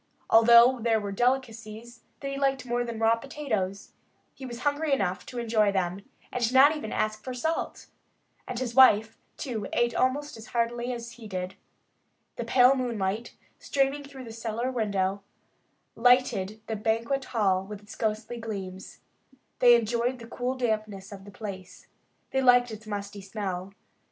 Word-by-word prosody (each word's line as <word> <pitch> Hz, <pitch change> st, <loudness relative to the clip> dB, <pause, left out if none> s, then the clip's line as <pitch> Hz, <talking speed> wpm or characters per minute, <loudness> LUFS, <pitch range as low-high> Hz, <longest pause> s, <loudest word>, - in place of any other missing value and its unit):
Although 235 Hz, +2 st, +7 dB
there 225 Hz, -1 st, +2 dB
were 205 Hz, -1 st, -4 dB
delicacies 235 Hz, 0 st, -2 dB, 0.2 s
that 275 Hz, -, -3 dB
he -, -, -3 dB
liked 270 Hz, -2 st, 0 dB
more 245 Hz, 0 st, 0 dB
than 235 Hz, -1 st, -5 dB
raw 225 Hz, +1 st, +4 dB
potatoes, 220 Hz, -8 st, -3 dB, 0.4 s
he 265 Hz, -, -9 dB
was 240 Hz, 0 st, -8 dB
hungry 290 Hz, +2 st, 0 dB
enough 185 Hz, -7 st, -1 dB
to 250 Hz, -, -8 dB
enjoy 220 Hz, -3 st, +2 dB
them 190 Hz, 0 st, -2 dB, 0.3 s
and 240 Hz, -2 st, 0 dB
not 275 Hz, +4 st, +6 dB
even 220 Hz, -8 st, -6 dB
ask 215 Hz, 0 st, -1 dB
for 255 Hz, -1 st, -5 dB
salt. 320 Hz, +6 st, -2 dB, 0.6 s
And 245 Hz, -, -4 dB
his 240 Hz, -1 st, -3 dB
wife, 225 Hz, -4 st, +6 dB, 0.2 s
too, 230 Hz, -7 st, -4 dB
ate 240 Hz, 0 st, +1 dB
almost 280 Hz, +1 st, 0 dB
as 220 Hz, -, -11 dB
heartily 240 Hz, +1 st, -1 dB
as 235 Hz, -1 st, -6 dB
he 235 Hz, -2 st, -11 dB
did. 185 Hz, -1 st, -4 dB, 0.8 s
The -, -, -4 dB
pale 255 Hz, +1 st, +5 dB
moonlight, 230 Hz, -4 st, -2 dB, 0.2 s
streaming 275 Hz, +1 st, 0 dB
through 275 Hz, -2 st, -10 dB
the 225 Hz, -2 st, -9 dB
cellar 230 Hz, +2 st, -3 dB
window, 200 Hz, -4 st, -1 dB, 0.7 s
lighted 230 Hz, -4 st, +3 dB
their 220 Hz, -, -3 dB
banquet 230 Hz, +5 st, 0 dB
hall 195 Hz, -5 st, +1 dB
with 205 Hz, +1 st, -9 dB
its 205 Hz, -, -11 dB
ghostly 220 Hz, +2 st, -2 dB
gleams. 195 Hz, -4 st, -7 dB, 0.6 s
They 240 Hz, -1 st, +8 dB
enjoyed 235 Hz, +2 st, 0 dB
the 235 Hz, -, -10 dB
cool 250 Hz, +2 st, -3 dB
dampness 215 Hz, -5 st, -2 dB
of 195 Hz, -1 st, -10 dB
the 205 Hz, -, -11 dB
place. 190 Hz, -3 st, -8 dB, 0.5 s
They 265 Hz, -, +1 dB
liked 245 Hz, -2 st, +5 dB
its 215 Hz, 0 st, -9 dB
musty 205 Hz, -1 st, -5 dB
smell. 190 Hz, -2 st, -5 dB
230 Hz, 160 wpm, -27 LUFS, 205-250 Hz, 0.8 s, They